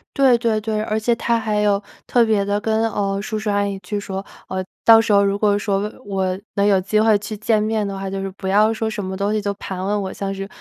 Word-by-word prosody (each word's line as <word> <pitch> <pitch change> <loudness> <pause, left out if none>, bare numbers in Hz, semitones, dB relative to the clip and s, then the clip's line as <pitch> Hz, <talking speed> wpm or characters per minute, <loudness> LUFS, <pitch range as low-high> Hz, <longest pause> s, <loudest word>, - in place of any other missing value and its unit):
对 265 -4 +5
对 230 -2 0
对， 215 0 -2
而 215 0 -1
且 235 +2 +1
他 235 0 0
还 215 -1 0
有 205 -1 +2 0.2
特 240 -2 +3
别 215 -3 +2
地 205 +1 0
跟， 220 +1 0
呃， 200 -1 -1
叔 215 +1 -3
叔 215 0 -3
阿 205 0 +1
姨 200 -1 -4
去 195 +3 -4
说， 195 -1 -4 0.3
呃， 190 0 -2 0.2
到 225 -1 +8
时 225 -2 +1
候 200 0 +5
如 200 0 0
果 205 -1 +3
说 200 -1 0
我 210 +1 -3 0.3
我 185 0 -2 0.2
能 200 - +2
有 195 -2 +4
机 215 +3 +1
会 215 -1 +4
去 210 +1 -6
见 215 0 +1
面 215 -1 0
的 195 - -5
话， 195 0 -4
就 195 0 -4
是 195 - -3
不 190 0 -6
要 215 +3 +4
说 220 0 -2
什 210 -2 -4
么 190 0 -4
东 200 +2 -1
西 215 - 0
就 200 0 -2
盘 190 -2 -6
问 205 +1 0
我， 190 -1 -4
像 195 0 -4
是 195 0 -5
205 Hz, 295 characters per minute, -20 LUFS, 195-220 Hz, 0.3 s, 到